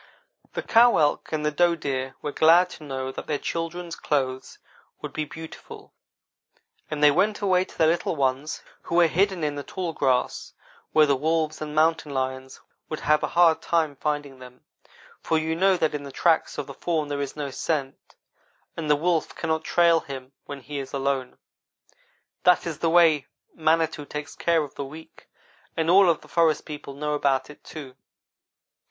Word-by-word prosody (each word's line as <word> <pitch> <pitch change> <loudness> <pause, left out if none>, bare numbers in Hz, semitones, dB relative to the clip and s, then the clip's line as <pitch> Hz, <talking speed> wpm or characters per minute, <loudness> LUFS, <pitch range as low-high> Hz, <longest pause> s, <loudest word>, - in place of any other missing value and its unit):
' - - -37
"The - - -2
cow 240 +1 +5
elk 150 -2 +1
and 155 -1 -2
the 150 - +1
doe 170 +3 +3
deer 135 -4 -3
were 150 - -2
glad 170 +4 +5
to - - -11
know 130 -2 -4
that - - -8
their 150 - 0
children's 165 +2 -4
clothes 130 -3 -2 0.4
would - - -7
be 155 - -2
beautiful, 160 +2 -11 1.0
and 150 -1 -3
they 150 - +8
went 210 +8 +1
away 185 -2 +2
to - - -17
their 160 - +4
little 170 0 0
ones 135 +1 -1 0.2
who - - -4
were 175 0 +6
hidden 185 +1 +1
in 150 -1 0
the 145 - -5
tall 180 -1 -4
grass, 130 -4 0 0.4
where 155 -1 +5
the 140 -1 +2
wolves 155 +2 -1
and 150 0 -5
mountain 155 -1 +2
lions 130 0 -3 0.3
would 155 - -5
have 150 0 +3
a - - 0
hard 170 -2 +5
time 160 -4 0
finding 145 -2 -3
them; 125 0 -13 0.6
for 160 - 0
you 160 0 -1
know 190 +2 +3
that 160 -3 0
in 150 - -3
the 140 -1 -9
tracks 165 +3 +1
of - - -3
the - - -9
fawn 160 -4 -2
there 145 0 -3
is 140 - -4
no 145 -2 -4
scent, 140 -2 -4 0.6
and 160 -2 -4
the 150 - +6
wolf 165 +1 0
cannot 160 -1 -1
trail 170 -1 +4
him 135 -3 -9
when 140 -1 -8
he 145 +2 -6
is 135 0 -7
alone. 135 -2 -2 1.1
That 180 -2 +4
is 165 -4 -4
the 165 - +1
way 160 -4 +4 0.3
Manitou 160 -1 +1
takes 150 0 -6
care 165 -2 +2
of 145 - -9
the 140 - -5
weak, 155 +4 -12 0.5
and 165 +1 +2
all 190 0 +7
of 165 - +1
the - - -16
forest 165 -2 +2
people 145 -2 -8
know 150 +1 -2
about 140 -1 0
it, 150 - -17
too. 140 -5 -9
155 Hz, 190 wpm, -25 LUFS, 140-165 Hz, 1.1 s, they